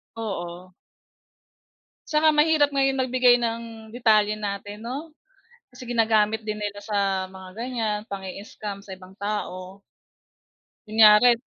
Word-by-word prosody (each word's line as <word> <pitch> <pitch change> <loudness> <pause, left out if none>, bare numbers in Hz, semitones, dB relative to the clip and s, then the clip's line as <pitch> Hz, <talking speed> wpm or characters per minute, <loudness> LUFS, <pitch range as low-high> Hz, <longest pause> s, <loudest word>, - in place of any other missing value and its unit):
Oo. 180 -4 -6 1.3
Tsaka, 310 0 +3
mahirap 300 -1 +4
ngayon 270 -1 +2
magbigay 250 -1 +4
ng 230 -1 -2 0.3
detalye 215 -3 +3
natin 205 0 -5
'no, 285 +7 -6 0.6
kasi 250 - -13
ginagamit 220 -2 +2
din 215 -1 -4
nila 205 -1 -4
sa 195 -3 0
mga 190 -1 -11
ganyan 230 -3 -2
pang-i-scam 200 +1 -7
sa 195 - -10
ibang 185 +1 -15
tao. 195 -2 -5 1.1
Kunyari 220 +2 +6
215 Hz, 110 wpm, -24 LUFS, 200-245 Hz, 1.3 s, Kunyari